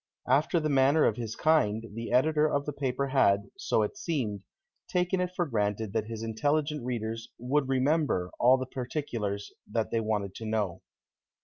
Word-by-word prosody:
After 150 Hz, +6 st, +3 dB
the 155 Hz, -, -1 dB
manner 140 Hz, +2 st, +4 dB
of 110 Hz, -, +2 dB
his 115 Hz, -2 st, -4 dB
kind, 115 Hz, -9 st, +2 dB
the 115 Hz, +1 st, -5 dB
editor 150 Hz, +4 st, +3 dB
of 145 Hz, 0 st, 0 dB
the 150 Hz, -, -3 dB
paper 135 Hz, 0 st, -1 dB
had, 100 Hz, -7 st, +3 dB
so 110 Hz, -, +1 dB
it 105 Hz, -, -3 dB
seemed, 120 Hz, -, -2 dB, 0.5 s
taken 180 Hz, +1 st, +1 dB
it 180 Hz, -, 0 dB
for 175 Hz, -, +1 dB
granted 105 Hz, -5 st, -1 dB
that 110 Hz, -1 st, -1 dB
his 115 Hz, -1 st, -5 dB
intelligent 145 Hz, +6 st, 0 dB
readers 115 Hz, -1 st, -3 dB
"would 135 Hz, +3 st, 0 dB
remember" 135 Hz, -, +1 dB
all 125 Hz, +2 st, +6 dB
the 130 Hz, -, -3 dB
particulars 120 Hz, -6 st, -4 dB, 0.2 s
that 115 Hz, 0 st, -1 dB
they 115 Hz, -, +1 dB
wanted 105 Hz, -3 st, -1 dB
to 110 Hz, -, -7 dB
know. 105 Hz, -5 st, -1 dB
125 Hz, 175 wpm, -29 LUFS, 110-145 Hz, 0.5 s, all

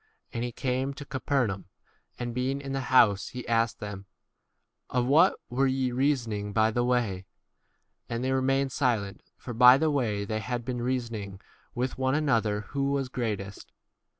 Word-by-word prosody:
And 115 Hz, -, -2 dB
he 120 Hz, -, -3 dB
came 130 Hz, +3 st, -2 dB
to 145 Hz, -, -8 dB
Capernaum, 130 Hz, -8 st, -1 dB, 0.5 s
and 120 Hz, -1 st, -4 dB
being 130 Hz, +3 st, -1 dB
in 140 Hz, -1 st, -6 dB
the 135 Hz, -, -1 dB
house, 110 Hz, -6 st, +5 dB
he 125 Hz, -1 st, -7 dB
asked 115 Hz, -2 st, +1 dB
them, 100 Hz, -2 st, -7 dB, 0.8 s
Of 125 Hz, -1 st, +1 dB
what 160 Hz, +8 st, +5 dB
were 135 Hz, +3 st, +1 dB
ye 130 Hz, -1 st, 0 dB
reasoning 120 Hz, -6 st, 0 dB
1 105 Hz, -, -6 dB
by 110 Hz, +1 st, +3 dB
the 120 Hz, +2 st, 0 dB
way? 115 Hz, -7 st, 0 dB, 0.8 s
31 115 Hz, -, -4 dB
And 115 Hz, -, -2 dB
they 130 Hz, -, 0 dB
remained 135 Hz, +1 st, +1 dB
silent, 115 Hz, -8 st, -1 dB, 0.2 s
for 120 Hz, -, -7 dB
by 125 Hz, +2 st, +8 dB
the 155 Hz, +1 st, +1 dB
way 110 Hz, -8 st, 0 dB
they 110 Hz, +1 st, -2 dB
had 120 Hz, +2 st, -4 dB
been 125 Hz, -1 st, -3 dB
reasoning 115 Hz, -6 st, -3 dB, 0.4 s
with 125 Hz, +2 st, -2 dB
one 130 Hz, +1 st, +1 dB
another 115 Hz, -9 st, +1 dB
who 140 Hz, -1 st, -1 dB
[was] 135 Hz, -2 st, -1 dB
great 115 Hz, -5 st, -1 dB
35 100 Hz, 0 st, -7 dB
est. -, -, -15 dB
125 Hz, 180 wpm, -28 LUFS, 110-135 Hz, 0.8 s, by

